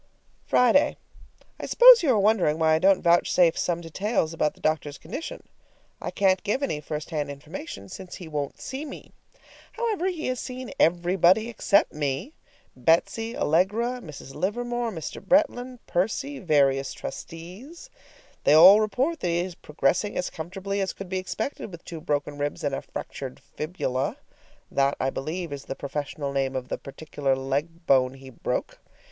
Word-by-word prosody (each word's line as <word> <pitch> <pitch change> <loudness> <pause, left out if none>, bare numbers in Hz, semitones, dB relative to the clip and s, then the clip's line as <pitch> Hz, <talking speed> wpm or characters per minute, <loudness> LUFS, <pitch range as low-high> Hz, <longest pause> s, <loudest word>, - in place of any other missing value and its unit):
Friday. 250 +4 +4 0.6
I - - -5
suppose - - +9
you 320 - +1
are 240 - +4
wondering 200 -7 +3
why 160 -1 +3
I 160 - +3
don't 190 +1 +4
vouchsafe 170 0 +4
some 170 -1 -1
details 170 0 -1
about 155 -2 0
the - - -21
doctor's 155 -2 -1
condition. 230 - -7 0.6
I - - -3
can't 190 -2 +2
give 255 +7 -1
any 150 - -1
first 150 +2 -5
hand 150 -3 -2
information, 140 - -8
since 180 - -9
he 175 - -9
won't 145 -3 -4
see 265 +3 -5
me. 290 - -9 0.6
However, 440 -6 -1
he 345 -4 -3
has 255 -1 -2
seen 255 -1 -6
everybody 180 +5 +3
except 200 -3 +2
me 150 - -2 0.4
Betsy, 170 - +1
Allegra, 215 +10 +1
Mrs. 145 - -10
Livermore, 240 - -2
Mr. 165 -8 -6
Bretland, 255 0 +2
Percy, 220 +10 -1
various 140 -5 +2
trustees. 200 - -9 0.5
They 145 - +5
all 190 +7 +9
report 260 +10 0
that 180 - -2
he 170 0 +1
is 180 0 -4
progressing 165 +6 -1
as 180 - -2
comfortably 195 +4 -4
as 190 - -1
could 195 -2 -9
be 190 0 -1
expected 215 +4 -4
with 170 -1 -11
two 165 -2 -7
broken 145 -1 -2
ribs 145 0 -3
and 145 -2 0
a - - -2
fractured 130 -2 -7
fibula. 140 -2 -3 0.5
That, 140 0 +2
I 135 - 0
believe, 160 +3 -4
is 140 -1 -7
the 135 - -5
professional 140 0 -4
name 135 -1 0
of 125 -1 -4
the - - -3
particular 140 -1 -2
leg 145 +6 -3
bone 130 -1 +3
he 135 0 -12
broke. 120 - -3
170 Hz, 165 wpm, -26 LUFS, 145-220 Hz, 0.6 s, suppose